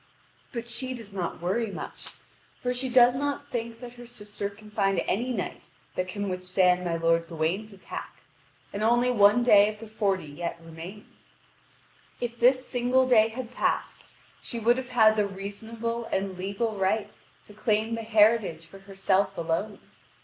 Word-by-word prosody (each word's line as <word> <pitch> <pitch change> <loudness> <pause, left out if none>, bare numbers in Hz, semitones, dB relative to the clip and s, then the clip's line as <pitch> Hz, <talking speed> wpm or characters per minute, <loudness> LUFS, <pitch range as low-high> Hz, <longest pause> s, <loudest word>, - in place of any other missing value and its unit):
But 235 -2 -5
she 255 +2 -2
does 220 -4 -10
not 175 -2 -4
worry 220 +5 0
much, 195 - -7 0.5
for 250 0 -1
she 255 +1 -2
does 245 0 +6
not 285 +1 -3
think 230 -1 -4
that 245 -1 -8
her 240 -1 -12
sister 205 -3 -5
can 210 +1 -15
find 195 -1 +1
any 245 +6 0
knight 205 -7 -3 0.3
who 185 - +1
can 200 +2 -4
withstand 185 -1 +2
my 170 -2 -1
lord 165 0 +2
Gawain's 170 +7 -2
attack, 195 -1 -8 0.6
and 200 - -3
only 240 +3 +3
one 210 +1 +5
day 210 -3 +7
of 210 - -13
the 225 - -8
forty 200 -5 0
yet 165 +4 -5
remains. 170 +6 -12 0.8
If 240 -1 -4
this 255 +2 +4
single 255 +1 +2
day 220 -4 +6
had 235 +1 -7
passed, - - -1 0.4
she 235 - -5
would 235 +2 +3
have 260 -1 -5
had 220 -3 +5
the 210 -1 +2
reasonable 225 +4 -5
and 195 -3 -2
legal 200 +5 -2
right 200 +2 0 0.3
to 210 - -14
claim 215 +1 0
the 230 - -2
heritage 215 -6 +3
for 195 +4 -14
herself 195 0 0
alone. 170 +5 -2
215 Hz, 165 wpm, -27 LUFS, 195-235 Hz, 0.8 s, day